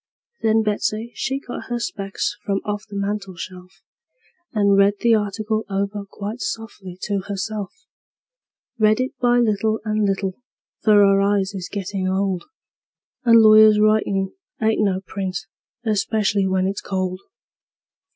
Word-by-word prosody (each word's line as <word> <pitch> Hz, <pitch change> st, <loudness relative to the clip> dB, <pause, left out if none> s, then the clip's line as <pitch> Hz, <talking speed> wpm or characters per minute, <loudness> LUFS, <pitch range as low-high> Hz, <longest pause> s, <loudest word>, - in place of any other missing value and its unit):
Then 220 Hz, 0 st, +3 dB
Betsey 215 Hz, +2 st, -1 dB
she 270 Hz, +1 st, -2 dB
got 245 Hz, -, -7 dB
her 240 Hz, -, -1 dB
specs 195 Hz, -, -3 dB
from 195 Hz, -1 st, 0 dB
off 205 Hz, 0 st, -4 dB
the 205 Hz, -, -10 dB
mantel 200 Hz, -1 st, -3 dB
shelf, 185 Hz, +1 st, -10 dB, 0.7 s
And 200 Hz, -2 st, +3 dB
read 200 Hz, +1 st, +4 dB
the 235 Hz, -1 st, +4 dB
article 215 Hz, +1 st, 0 dB
over 200 Hz, +1 st, -2 dB
quite 210 Hz, +4 st, -6 dB
softly 205 Hz, -5 st, -6 dB
to 200 Hz, -1 st, -1 dB
herself; 205 Hz, 0 st, -3 dB, 1.1 s
Read 215 Hz, +1 st, +4 dB
it 255 Hz, +1 st, -1 dB
by 245 Hz, -1 st, +3 dB
little 220 Hz, -1 st, +1 dB
and 215 Hz, 0 st, 0 dB
little, 195 Hz, +2 st, -2 dB, 0.4 s
for 215 Hz, -, +4 dB
her 195 Hz, -1 st, +5 dB
eyes 200 Hz, 0 st, +1 dB
is 190 Hz, -1 st, -6 dB
gettin' 195 Hz, -1 st, -3 dB
old, 190 Hz, -1 st, -1 dB, 0.8 s
And 230 Hz, -1 st, +7 dB
lawyers' 215 Hz, 0 st, +7 dB
writin' 205 Hz, -3 st, +2 dB, 0.3 s
ain't 220 Hz, -1 st, +2 dB
no 190 Hz, -2 st, +1 dB
print, 190 Hz, -2 st, -4 dB, 0.5 s
especially 210 Hz, -2 st, +1 dB
when 185 Hz, 0 st, +1 dB
it's 195 Hz, +1 st, -2 dB
cold. 185 Hz, -1 st, -3 dB
205 Hz, 140 wpm, -22 LUFS, 195-215 Hz, 1.1 s, And